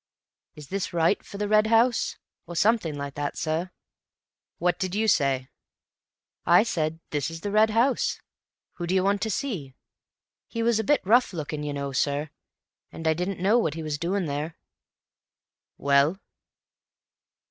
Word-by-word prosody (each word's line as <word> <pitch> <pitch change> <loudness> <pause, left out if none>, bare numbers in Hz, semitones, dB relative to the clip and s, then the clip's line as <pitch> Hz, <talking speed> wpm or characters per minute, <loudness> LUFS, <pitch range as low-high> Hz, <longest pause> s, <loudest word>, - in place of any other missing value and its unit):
"'Is 150 -2 -11
this 190 -1 -3
right 170 +3 +2
for 200 - -9
the 205 0 -1
Red 215 +1 +4
House?' 230 +2 +2 0.3
or 175 - -7
something 200 -5 +2
like 140 -1 -5
that, 145 0 -3
sir." 160 +3 -1 0.9
"What 175 +1 0
did 185 -1 -2
you 220 +1 +1
say?" 135 -8 +2 1.0
"I 175 +4 +6
said, 160 -7 -2
'This 145 0 -1
is 165 0 -8
the 205 - -3
Red 215 +1 +5
House. 235 +4 +1 0.6
Who 175 - -4
do 185 - +1
you 185 - +3
want 200 +1 +1
to 220 - -1
see?' 185 - -3 0.7
He 230 -1 -3
was 230 -1 +2
a - - 0
bit 290 -1 +2
rough 235 +2 +4
looking, 155 -2 -4
you 150 0 -3
know, 140 -1 -3
sir, 145 +3 -1 0.6
and 165 - -5
I 160 - +4
didn't 180 +3 -3
know 215 +5 +4
what 160 -9 -1
he 165 - -5
was 150 -2 -3
doing 180 +3 -1
there." 150 +2 -4 1.2
"Well?" 140 +5 +3
175 Hz, 165 wpm, -26 LUFS, 150-210 Hz, 1.2 s, I